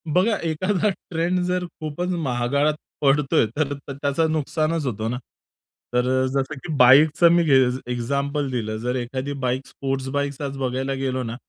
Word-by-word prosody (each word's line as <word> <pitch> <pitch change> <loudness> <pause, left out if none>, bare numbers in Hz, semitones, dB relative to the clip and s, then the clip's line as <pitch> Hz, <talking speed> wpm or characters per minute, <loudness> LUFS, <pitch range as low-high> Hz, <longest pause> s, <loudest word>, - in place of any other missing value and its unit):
बघा, 185 +8 +2
एखादा 185 +5 0 0.2
ट्रेंड 175 +2 0
जर 180 0 -1
खूपच 170 +1 -5
महागात 140 +2 +1 0.3
पडतोय, 140 -3 +3
तर 145 -2 0 0.2
त्याचं 140 +3 0
नुकसानच 155 +1 -1
होतं 110 -3 -2
ना. 125 - -2 0.8
तर 125 0 +2
अ, 130 0 +2
जसं 140 +2 -1
की 160 - -4
बाईकचा 145 +6 +6
मी 170 0 +4
गेज 130 -4 +3
एक्झाम्पल 140 +4 -1
दिलं, 110 -3 -2
जर 125 +2 -2
एखादी 130 +3 -3
बाईक 130 +2 -1
स्पोर्ट्स 135 -1 -3
बाईक 140 0 -2
आज 140 -1 -4
बघायला 130 +1 -2
गेलो 130 -1 -2
ना, 115 -1 -5
140 Hz, 155 wpm, -23 LUFS, 130-155 Hz, 0.8 s, बाईकचा